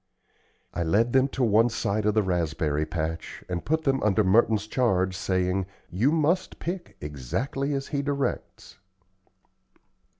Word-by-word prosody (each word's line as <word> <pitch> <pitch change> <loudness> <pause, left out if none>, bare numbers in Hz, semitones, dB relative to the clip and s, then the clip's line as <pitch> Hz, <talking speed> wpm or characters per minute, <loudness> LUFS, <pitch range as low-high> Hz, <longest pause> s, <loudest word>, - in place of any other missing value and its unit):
I - - -2
led 105 +9 +2
them 130 0 +4
to 135 -1 -2
one 115 +1 +4
side 105 -2 -1
of 105 - +2
the 110 - +3
raspberry 80 -4 0
patch 80 -1 -4
and 90 -1 -3
put 160 +1 0
them 135 -2 +1
under 105 0 +3
Merton's 105 +2 +3
charge 95 -6 +1
saying, 95 0 0 0.2
"You 110 - +2
must 165 +4 +1
pick 175 +1 -5
exactly 115 - -3
as 135 0 -4
he 140 -2 -1
directs." 140 -1 -3
105 Hz, 140 wpm, -26 LUFS, 90-135 Hz, 0.2 s, them